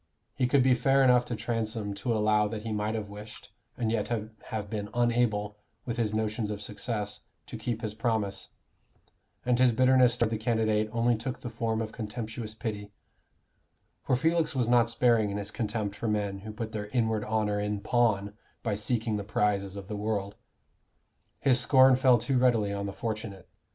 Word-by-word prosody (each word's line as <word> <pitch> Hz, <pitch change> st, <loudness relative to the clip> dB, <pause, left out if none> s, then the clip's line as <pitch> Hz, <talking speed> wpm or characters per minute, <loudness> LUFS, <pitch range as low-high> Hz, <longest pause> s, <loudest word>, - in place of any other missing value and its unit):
He 130 Hz, -2 st, +1 dB
could 130 Hz, +1 st, +4 dB
be 130 Hz, 0 st, +5 dB
fair 135 Hz, +2 st, +3 dB
enough 125 Hz, -1 st, +5 dB
to 120 Hz, -, -3 dB
Transome 110 Hz, -2 st, -2 dB
to 100 Hz, +5 st, -3 dB
allow 105 Hz, -1 st, +3 dB
that 105 Hz, 0 st, -5 dB
he 115 Hz, -, -4 dB
might 105 Hz, +1 st, -1 dB
have 110 Hz, -2 st, -3 dB
wished, 105 Hz, +1 st, -11 dB, 0.3 s
and 115 Hz, -3 st, 0 dB
yet 110 Hz, -3 st, 0 dB
have 110 Hz, -2 st, -5 dB
been 105 Hz, -1 st, -4 dB
unable, 115 Hz, -4 st, +1 dB, 0.3 s
with 120 Hz, -2 st, -3 dB
his 110 Hz, -3 st, 0 dB
notions 110 Hz, 0 st, -1 dB
of 105 Hz, -1 st, -4 dB
success, 105 Hz, 0 st, -4 dB, 0.3 s
to -, -, -8 dB
keep 120 Hz, -1 st, -3 dB
his 110 Hz, -1 st, -3 dB
promise; 110 Hz, -3 st, -2 dB, 1.0 s
and 125 Hz, 0 st, +2 dB
his 125 Hz, -1 st, +5 dB
bitterness 130 Hz, 0 st, +4 dB
toward 115 Hz, -2 st, +1 dB
the 110 Hz, -, -1 dB
candidate 110 Hz, -2 st, +1 dB
only 115 Hz, +1 st, +2 dB
took 125 Hz, +4 st, -5 dB
the 120 Hz, -, -6 dB
form 115 Hz, -1 st, -1 dB
of 110 Hz, -, -6 dB
contemptuous 110 Hz, 0 st, -6 dB
pity; 105 Hz, -3 st, -5 dB, 1.1 s
for -, -, +1 dB
Felix 160 Hz, +2 st, +1 dB
was 125 Hz, -3 st, +1 dB
not 120 Hz, -1 st, +4 dB
sparing 115 Hz, -3 st, +3 dB
in 100 Hz, -, -3 dB
his 100 Hz, 0 st, -5 dB
contempt 105 Hz, -3 st, -3 dB
for 115 Hz, -, -4 dB
men 100 Hz, -2 st, -1 dB
who 110 Hz, +2 st, -8 dB
put 110 Hz, +1 st, -5 dB
their 105 Hz, -1 st, -4 dB
inward 110 Hz, -2 st, 0 dB
honor 105 Hz, -1 st, 0 dB
in 105 Hz, 0 st, -2 dB
pawn 105 Hz, -2 st, +1 dB, 0.3 s
by 110 Hz, -, 0 dB
seeking 110 Hz, +1 st, -1 dB
the 100 Hz, -, -4 dB
prizes 100 Hz, -1 st, 0 dB
of 100 Hz, -1 st, -8 dB
the 105 Hz, -, -4 dB
world. 100 Hz, -1 st, -2 dB, 1.1 s
His 130 Hz, -2 st, +4 dB
scorn 130 Hz, 0 st, +6 dB
fell 130 Hz, -1 st, +5 dB
too 125 Hz, +3 st, 0 dB
readily 115 Hz, -5 st, +2 dB
on 100 Hz, 0 st, -3 dB
the -, -, -3 dB
fortunate. 105 Hz, -3 st, -5 dB
110 Hz, 185 wpm, -29 LUFS, 105-120 Hz, 1.1 s, scorn